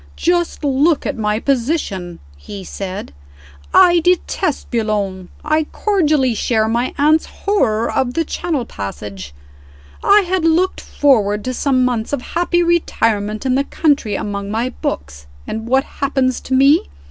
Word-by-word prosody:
"Just 345 Hz, -2 st, 0 dB
look 285 Hz, +3 st, +2 dB
at -, -, -2 dB
my 210 Hz, -1 st, -1 dB
position," 230 Hz, -, -1 dB, 0.2 s
he 190 Hz, -, -9 dB
said. 190 Hz, -, -6 dB, 0.6 s
"I 350 Hz, -1 st, +6 dB
detest 360 Hz, -1 st, 0 dB
Boulogne; 205 Hz, -5 st, -2 dB, 0.2 s
I 310 Hz, 0 st, +1 dB
cordially 305 Hz, -, +1 dB
share 220 Hz, 0 st, +1 dB
my 235 Hz, +3 st, 0 dB
aunt's 305 Hz, +2 st, +3 dB
horror 235 Hz, -, 0 dB
of 250 Hz, -1 st, -1 dB
the 330 Hz, -, 0 dB
Channel 300 Hz, -5 st, -2 dB
passage; 100 Hz, -4 st, -7 dB, 0.7 s
I 415 Hz, +1 st, +6 dB
had 370 Hz, -2 st, -1 dB
looked 330 Hz, +3 st, +2 dB
forward 210 Hz, -7 st, +1 dB
to 255 Hz, -, -2 dB
some 255 Hz, -1 st, +1 dB
months 240 Hz, 0 st, -2 dB
of 265 Hz, -3 st, -2 dB
happy 345 Hz, +1 st, +1 dB
retirement 220 Hz, -11 st, 0 dB
in 260 Hz, -, +2 dB
the 275 Hz, +2 st, +2 dB
country 285 Hz, -12 st, +1 dB
among 200 Hz, -1 st, -4 dB
my 230 Hz, +4 st, -1 dB
books 70 Hz, 0 st, -4 dB, 0.2 s
and 220 Hz, +1 st, -5 dB
what 265 Hz, +2 st, +3 dB
happens 270 Hz, -3 st, -1 dB
to 260 Hz, -, -2 dB
me? 275 Hz, -, +4 dB
255 Hz, 145 wpm, -18 LUFS, 210-310 Hz, 0.7 s, I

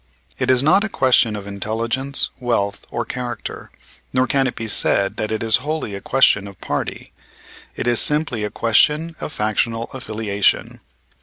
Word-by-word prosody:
It -, -, 0 dB
is 130 Hz, 0 st, +4 dB
not 155 Hz, +8 st, +4 dB
a 220 Hz, -, -2 dB
question 125 Hz, -, +3 dB
of 100 Hz, -1 st, -7 dB
intelligence, 115 Hz, +7 st, -1 dB
wealth 100 Hz, -5 st, -1 dB
or -, -, -3 dB
character, 120 Hz, -3 st, -6 dB, 0.4 s
nor 130 Hz, 0 st, +2 dB
can 135 Hz, +1 st, +1 dB
it 125 Hz, -, -4 dB
be 115 Hz, -, -5 dB
said 100 Hz, -2 st, +2 dB
that 110 Hz, -, -2 dB
it 110 Hz, -, -2 dB
is 110 Hz, -1 st, +4 dB
wholly 145 Hz, -4 st, -4 dB
a 100 Hz, -, -6 dB
question 100 Hz, -7 st, +3 dB
of 100 Hz, -2 st, -13 dB
party. -, -, -4 dB, 0.6 s
It -, -, -4 dB
is 120 Hz, -1 st, +3 dB
simply 150 Hz, -7 st, +1 dB
a 105 Hz, -, -2 dB
question 150 Hz, +10 st, +2 dB
of -, -, -5 dB
factional 115 Hz, +1 st, -1 dB
affiliation. 110 Hz, -5 st, -1 dB
115 Hz, 165 wpm, -20 LUFS, 105-130 Hz, 0.6 s, is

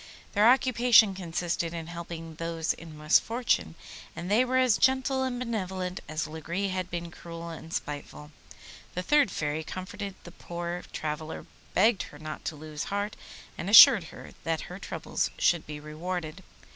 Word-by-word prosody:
Their 210 Hz, +2 st, +6 dB
occupation 245 Hz, -4 st, +5 dB
consisted 170 Hz, -2 st, -2 dB
in 165 Hz, -1 st, -5 dB
helping 170 Hz, -1 st, -7 dB
those 165 Hz, -1 st, -1 dB
in 160 Hz, -2 st, -11 dB
misfortune, 150 Hz, -, +2 dB, 0.4 s
and 175 Hz, +3 st, -5 dB
they 225 Hz, +4 st, +5 dB
were 255 Hz, 0 st, 0 dB
as 255 Hz, -4 st, +4 dB
gentle 265 Hz, 0 st, +2 dB
and 260 Hz, -2 st, -1 dB
benevolent 190 Hz, -6 st, -3 dB
as 155 Hz, 0 st, -2 dB
Lagree 170 Hz, +5 st, -3 dB
had 185 Hz, -1 st, -3 dB
been 170 Hz, -1 st, -5 dB
cruel 170 Hz, +1 st, -8 dB
and 160 Hz, 0 st, -9 dB
spiteful. 150 Hz, -1 st, -5 dB, 0.6 s
The 180 Hz, -, -2 dB
third 295 Hz, +1 st, +4 dB
Fairy 155 Hz, -2 st, -2 dB
comforted 190 Hz, +3 st, -6 dB
the 175 Hz, -, -10 dB
poor 175 Hz, 0 st, -5 dB
traveller, 155 Hz, +1 st, -4 dB, 0.3 s
begged 210 Hz, 0 st, +4 dB
her 145 Hz, -, -13 dB
not 155 Hz, +1 st, -7 dB
to 160 Hz, -, -3 dB
lose 150 Hz, 0 st, -6 dB
heart, 205 Hz, +1 st, -2 dB, 0.4 s
and 180 Hz, -, -3 dB
assured 210 Hz, -3 st, +10 dB
her -, -, -11 dB
that 165 Hz, -1 st, -1 dB
her 180 Hz, +2 st, -8 dB
troubles -, -, -2 dB
should 170 Hz, -2 st, +2 dB
be 150 Hz, 0 st, -6 dB
rewarded. 160 Hz, +3 st, -5 dB
175 Hz, 160 wpm, -28 LUFS, 160-205 Hz, 0.6 s, assured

